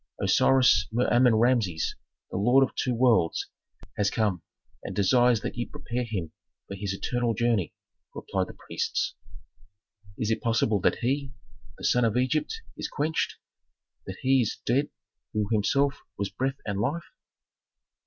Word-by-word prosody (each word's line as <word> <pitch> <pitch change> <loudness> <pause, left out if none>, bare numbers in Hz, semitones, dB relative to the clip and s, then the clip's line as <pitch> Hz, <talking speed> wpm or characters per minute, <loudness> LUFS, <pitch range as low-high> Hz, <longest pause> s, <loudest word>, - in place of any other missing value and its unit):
"Osiris 125 -6 +4
Mer 120 +3 +1
Amen 120 -1 +5
Rameses, 110 -8 +1 0.4
the - - -3
lord 125 +7 +4
of - - -20
two 125 -2 -1
worlds, 115 -8 +2 0.5
has 100 -1 +2
come 105 -7 0 0.4
and - - -6
desires 120 +3 +4
that - - -4
ye 120 0 -3
prepare 120 +1 -4
him 95 -8 -4 0.4
for - - -7
his 100 0 -3
eternal 120 +3 -1
journey," 115 -7 0 0.4
replied 95 -1 -2
the - - -11
priests. - - -1 1.0
"Is 110 0 -1
it 110 - 0
possible 115 -3 +1
that - - +3
he, 135 +2 -1 0.4
the - - -12
sun 125 - +3
of 115 0 +1
Egypt, 155 - 0
is - - -4
quenched? 155 +2 -1 0.7
That - - -6
he 130 0 +4
is 110 - -2
dead 135 +5 +1 0.4
who 105 -1 0
himself 135 +6 +2 0.2
was 100 -1 -2
breath 135 +1 -2
and 100 -2 -2
life?" 150 +9 -1
120 Hz, 150 wpm, -27 LUFS, 105-130 Hz, 1.0 s, Amen